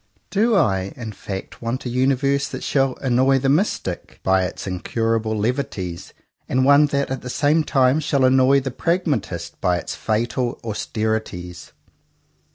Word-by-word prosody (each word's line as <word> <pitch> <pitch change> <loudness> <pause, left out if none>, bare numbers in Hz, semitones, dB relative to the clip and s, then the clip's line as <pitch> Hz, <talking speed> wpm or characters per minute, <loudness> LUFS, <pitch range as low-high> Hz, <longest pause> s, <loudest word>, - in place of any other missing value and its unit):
Do 220 +3 +3
I, 95 - +1
in 115 -3 -6
fact, 95 -2 -7
want 120 +3 -3
a - - -2
universe 135 +2 +1
that - - -7
shall 135 -2 +1
annoy 130 +1 +3
the 135 +1 0
mystic 140 - -1
by 95 0 +3
its - - -6
incurable 110 +4 -1
levities, 105 -7 -3 0.4
and 130 0 +2
one 145 +2 +6
that, 140 -1 -1
at 135 - -3
the 125 - -7
same 150 +4 +2
time, 130 0 +3
shall 140 -3 +1
annoy 130 +1 +4
the 135 0 -4
pragmatist 150 - -2
by 90 -1 +2
its - - -5
fatal 120 +3 -1
austerities? 110 -5 -3
125 Hz, 150 wpm, -21 LUFS, 110-140 Hz, 0.4 s, one